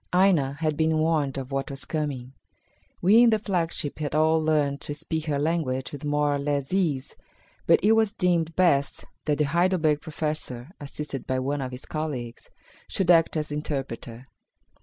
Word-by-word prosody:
Aina 180 -7 +3
had 155 0 -1
been 160 0 +2
warned 155 -4 +1
of 135 0 -5
what 135 0 -2
was 135 -1 -7
coming. 140 -5 -3 0.7
We 210 +6 +7
in 240 - +7
the 220 - +3
flagship 170 -8 -2
had 150 -1 -2
all 160 +1 +3
learned 145 -3 +1
to 145 - -5
speak 160 +1 -4
her 145 -2 0
language 145 -4 -1
with 145 -1 -8
more 145 0 +1
or 145 - -1
less 140 +1 -2
ease, 155 -9 0 0.5
but - - +6
it 210 - +5
was 225 -2 +4
deemed 175 -5 0
best 140 -7 +2 0.2
that 150 -2 +1
the 150 - +2
Heidelberg 160 -1 +2
Professor, 150 -4 -4
assisted 145 -1 -6
by 130 - 0
one 140 +2 -1
of 130 -1 -4
his 125 +2 -8
colleagues, 135 -7 -5 0.4
should 185 -2 +2
act 165 -1 +4
as 150 -1 -3
interpreter. 135 -4 -5
150 Hz, 175 wpm, -26 LUFS, 140-165 Hz, 0.7 s, We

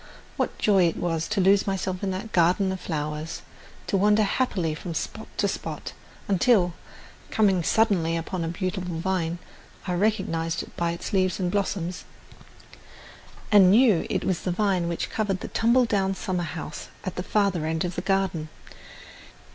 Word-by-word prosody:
What - - -2
joy 195 -4 +4
it 165 - -2
was 165 -2 -1
to 210 -1 -1
lose 195 +2 +4
myself 190 -1 -2
in 195 - -1
that 190 +4 -4
garden 180 +3 +3
of 190 - -4
flowers, 155 0 -4 0.4
to - - -1
wander 210 +2 +4
happily 195 -7 0
from 165 +2 -6
spot - - -4
to - - +2
spot, - - -5 0.3
until, 195 -2 +3 0.6
coming 195 -5 +3
suddenly 175 -4 +2
upon 165 +1 -3
a - - -2
beautiful 180 0 -3
vine, 170 -1 -1 0.5
I 180 - -1
recognized 175 -4 0
it - - -14
by 170 0 0
its 170 - -6
leaves 185 -1 +2
and 180 -2 0
blossoms, 185 -3 -2 1.5
and 200 -3 +7
knew 215 -3 +5
it - - -1
was 185 -3 -1
the - - -3
vine 185 -2 +1
which 170 -1 -3
covered 200 -4 -1
the - - -6
tumble 240 +2 +3
down 195 -3 0
summer 180 -2 -2
house 150 -1 -6 0.2
at 185 - -4
the - - -2
farther 190 -5 +1
end 160 +2 -1
of 175 - -3
the - - -3
garden! 190 -5 0
185 Hz, 165 wpm, -25 LUFS, 170-200 Hz, 1.5 s, and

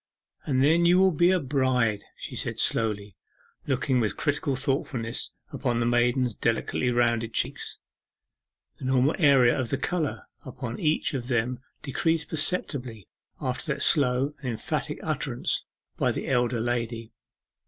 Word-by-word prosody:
'And 130 -2 +2
then 165 +4 +4
you 175 +1 +5
will 190 0 +5
be 175 +2 +3
a 185 0 +3
bride!' 130 -7 0
she - - -7
said - - -3
slowly, 105 -3 +2 0.5
looking 130 -1 +1
with 105 -4 -1
critical 145 -2 0
thoughtfulness 130 -3 -2 0.2
upon 120 -3 -1
the 120 - +1
maiden's 120 +1 +2
delicately 115 +2 -1
rounded 115 -2 +1
cheeks. - - -1 1.0
The - - -7
normal 130 +3 +3
area 135 -6 +5
of 130 -3 -2
the - - 0
colour 170 -4 -2 0.2
upon 125 -2 -6
each 155 -1 0
of 125 -3 -4
them 120 0 0 0.2
decreased 160 +3 0
perceptibly 140 - -1 0.3
after - - -3
that - - -3
slow 135 0 +3
and 135 -2 -4
emphatic 115 - -3
utterance - - 0 0.3
by - - +1
the - - -4
elder 125 -2 +1
lady. 115 -1 -3
125 Hz, 145 wpm, -26 LUFS, 120-145 Hz, 1.0 s, you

